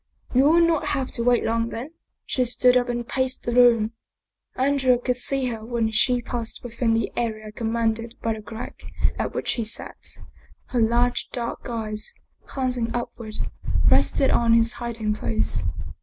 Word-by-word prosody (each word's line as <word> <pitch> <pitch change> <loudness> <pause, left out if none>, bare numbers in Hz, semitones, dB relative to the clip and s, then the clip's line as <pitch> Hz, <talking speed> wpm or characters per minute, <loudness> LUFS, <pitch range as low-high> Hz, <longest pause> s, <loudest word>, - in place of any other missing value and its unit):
" - - -21
You 260 +2 +5
will 335 +3 +6
not 330 -2 +1
have 265 -1 -3
to 235 - -2
wait 245 0 +3
long 230 0 0
then." 245 +7 -6 0.3
She 255 - +1
stood 250 +1 +4
up 245 -1 +2
and 240 -1 -2
paced 260 -1 -1
the 240 - -2
room. 235 -3 +5 0.6
Andrea 265 -1 +3
could 250 0 -1
see 270 +1 +1
her 225 -2 -5
when 230 -1 -1
she 245 +2 +3
passed 235 -1 -4
within 235 -1 0
the 225 -2 0
area 215 -2 -3
commanded 230 +1 -1
by 225 - 0
the 220 - -7
crack 225 +3 -8 0.4
at - - -2
which - - -1
he 235 - -1
sat. 220 - -4 0.5
Her 250 - 0
large, 240 +2 +2
dark 240 0 -4
eyes, 215 -2 -3 0.3
glancing 250 -3 -1
upward, 235 -2 -5 0.6
rested 270 - +3
on 230 -1 +4
his 230 0 +4
hiding 230 -3 -1
place. 110 - -1
235 Hz, 170 wpm, -24 LUFS, 225-250 Hz, 0.6 s, will